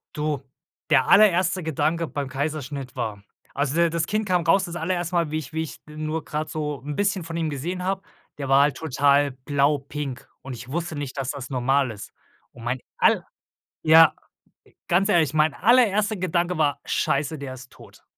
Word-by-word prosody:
Du, 150 -2 -1 0.5
der 135 -3 +4
allererste 185 -3 +5
Gedanke 160 +1 -1
beim 140 -3 -4
Kaiserschnitt 140 -1 -4
war 110 -5 -4 0.3
also 140 0 -1
der 170 0 +4
das 165 -1 -1
Kind 215 +1 -1
kam 180 -3 +1
raus, 190 +4 +3
das 175 -1 -7
allererste 175 +1 -2
Mal, 170 -3 +1
wie 155 - -1
ich 155 -1 -7
wie 160 - -1
ich, 160 -3 -6
äh, - - -11
nur 155 +1 -3
grad 155 +1 -3
so 150 -2 -4
'n 145 0 -4
bisschen 200 -1 0
von 165 0 -6
ihm 165 -2 -1
gesehen 170 +6 -4
habe 190 +1 -1 0.4
der 140 -2 -4
war 135 +1 +6
halt 145 0 +1
total 145 -1 +2
blau 140 +3 +1
pink 140 -1 -6
und 135 - -7
ich 120 +2 -10
wusste 165 0 -3
nicht, 145 -2 -5
dass 135 -1 -2
das 140 -3 -7
normal 135 +1 +1
ist. 105 -2 -10 0.4
Und 115 - -13
mein 125 +2 -1 0.2
all - - +3 0.6
ja, 160 -1 +7 0.8
ganz 185 +3 +3
ehrlich, 160 -7 +3
mein 155 -1 +3
allererste 215 - +3
Gedanke 175 -1 0
war: 150 -2 +1
„Scheiße, 145 +3 0
der 140 -2 -6
ist 130 0 -12
tot.“ - - -17
155 Hz, 190 wpm, -24 LUFS, 140-170 Hz, 0.8 s, ja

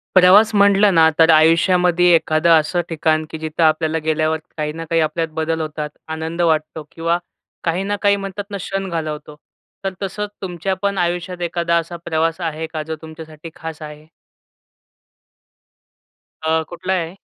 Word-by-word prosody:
प्रवास 195 +5 +6
म्हटलं 200 0 +5
ना 160 -1 +6
तर 165 0 +6
आयुष्यामध्ये 175 +2 +4
एखादं 160 +1 +1
असं 165 +3 -1
ठिकाण, 155 -1 0
की 160 - -6
जिथं 160 +1 -2
आपल्याला 160 0 +2
गेल्यावर 155 0 +1 0.2
काही 150 -1 -2
ना 165 +1 -6
काही 165 -1 +2
आपल्यात 160 +1 -1
बदल 160 +1 -1
होतात, 150 -1 -4 0.2
आनंद 160 +2 -4
वाटतो 155 -1 0
किंवा 165 +1 0 0.5
काही 175 +3 0
ना 205 +1 -1
काही 200 -1 +4
म्हणतात 195 0 -5
ना 200 - -3
क्षण 195 0 -4
घालवतो. 155 -3 -5 0.5
तर 190 - -1
तसंच 205 +2 -4
तुमच्या 185 0 -3
पण 200 -1 -1
आयुष्यात 175 0 -2
एखादा 170 -1 +1
असा 170 +1 -3
प्रवास 165 +1 0
आहे 160 -1 -3
का 155 -1 -3
जो 160 +1 -5
तुमच्यासाठी 160 0 -10
खास 160 -1 -8
आहे? 150 0 -9 2.4
अ, 160 0 +2
कुठला 180 +2 -3
आहे? 170 -1 -2
165 Hz, 155 wpm, -19 LUFS, 160-180 Hz, 2.4 s, प्रवास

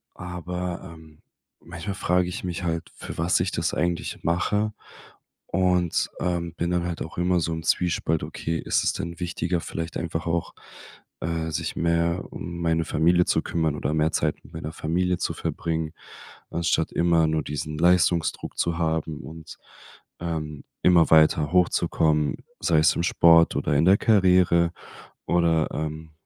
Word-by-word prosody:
aber 90 0 -5
ähm, 80 -1 -17 0.4
manchmal 85 +4 -6
frage 90 -1 +1
ich 90 - -6
mich 90 -1 -4
halt, 85 -1 -2
für - - -8
was 85 +2 +2
ich 90 +1 0
das 85 +1 -1
eigentlich 85 +1 -2
mache 105 +5 0 0.7
und, 90 -2 +1
ähm, 85 -1 -1
bin 85 +1 -2
dann 90 -1 0
halt 85 -1 -4
auch 80 - -10
immer 90 0 +2
so 80 0 -1
im 80 - -5
Zwiespalt: 80 -1 0
Okay, 80 0 -3
ist - - 0
es - - +1
denn 85 +2 -5
wichtiger, 90 0 -2
vielleicht 80 0 -5
einfach 85 0 -3
auch, 85 0 -1 0.7
äh, 80 0 -2
sich 75 - -3
mehr 85 +1 0
um 85 0 -6
meine 80 -1 +1
Familie 85 +3 +3
zu - - +1
kümmern 80 -3 -1
oder 75 0 -2
mehr 80 +1 +2
Zeit - - 0
mit - - -17
meiner 80 -1 -5
Familie 90 +3 0
zu - - -2
verbringen, 80 -1 -3 0.6
anstatt 85 -1 0
immer 85 -2 +3
nur 80 -1 0
diesen 75 +1 -4
Leistungsdruck 85 -1 +2
zu 85 -1 0
haben 80 -2 -1
und, 80 0 -10 0.6
ähm, 80 -4 -4 0.2
immer 85 -2 +5
weiter 80 -1 +5
hochzukommen, 80 -4 +2 0.2
sei 80 -3 +3
es 80 - +4
im 85 - -1
Sport 85 -1 +5
oder - - 0
in 75 +3 +3
der 95 +2 +6
Karriere. 90 -6 +4 0.6
Oder, 85 -2 +2
ähm, 80 +1 -5
85 Hz, 160 wpm, -25 LUFS, 80-90 Hz, 0.7 s, der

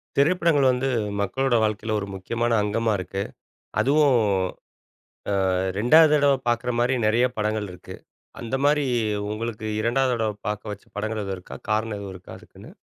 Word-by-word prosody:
திரைப்படங்கள் 155 -2 +3
வந்து 125 +2 -1 0.3
மக்களோட 130 +6 0
வாழ்க்கையில 110 0 -1
ஒரு 100 - -5
முக்கியமான 115 +4 -1
அங்கமா 110 +2 0
இருக்கு. 95 +2 -4 0.6
அதுவும், 145 -1 +4 1.3
ஆ - - +1 0.3
2வது 150 +7 +6
தடவ 145 -1 +4
பாக்ற 120 +1 0
மாரி 120 +2 +2
நெறைய 115 +4 +3
படங்கள் 105 -1 -1
இருக்கு. 90 - -11 0.4
அந்த 115 +2 -4
மாரி 145 0 +3 0.4
உங்களுக்கு 110 0 -4
2வது 125 +3 +1
தடவ 110 -2 -1 0.2
பாக்க 105 0 -3
வச்ச 100 - -10
படங்கள் 110 +1 -2
எதுவும் 95 -1 -4
இருக்கா? 90 - -10
காரணம் 110 0 0
எதுவும் 100 -2 -7
இருக்கா 90 - -12
அதுக்குன்னு? - - -15
115 Hz, 145 wpm, -24 LUFS, 105-135 Hz, 1.3 s, 2வது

